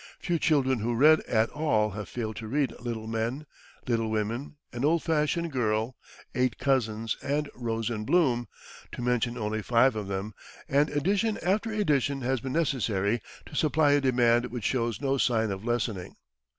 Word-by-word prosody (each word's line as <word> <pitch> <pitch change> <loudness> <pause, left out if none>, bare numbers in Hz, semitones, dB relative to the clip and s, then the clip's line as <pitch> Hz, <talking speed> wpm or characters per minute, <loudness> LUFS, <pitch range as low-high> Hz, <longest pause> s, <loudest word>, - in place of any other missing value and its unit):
Few 175 -3 -1
children 130 -6 +2
who 115 +3 -1
read 155 +6 +6
at 110 0 +1
all 110 -9 +1
have 105 0 -6
failed 110 -3 -4
to 110 - -6
read 135 +2 0
"Little 115 -2 -4
Men," 115 +6 -2 0.4
"Little 115 -3 0
Women," 110 +7 -2 0.2
"An 120 +1 -4
Old 160 +3 +2
Fashioned 165 +1 0
Girl," 115 -1 0 0.4
"Eight 125 -1 0
Cousins," 115 -5 0
and 145 +1 -1
"Rose 115 -1 -2
in 105 -2 -3
Bloom," 125 -4 +2 0.5
to - - -5
mention 125 0 0
only 110 -1 -2
five 120 +3 +3
of 105 -2 -4
them, 100 +2 -4 0.3
and 145 +2 +3
edition 200 +9 +1
after 205 +5 +1
edition 145 - +1
has 130 +1 0
been 130 +1 -4
necessary 115 - 0 0.2
to - - -14
supply 150 -1 +3
a 145 0 +4
demand 120 -2 +3
which 120 -3 -6
shows 115 -2 -1
no 135 -1 0
sign 110 -4 +2
of 95 +1 -5
lessening. 110 -6 -2
120 Hz, 170 wpm, -28 LUFS, 110-145 Hz, 0.5 s, read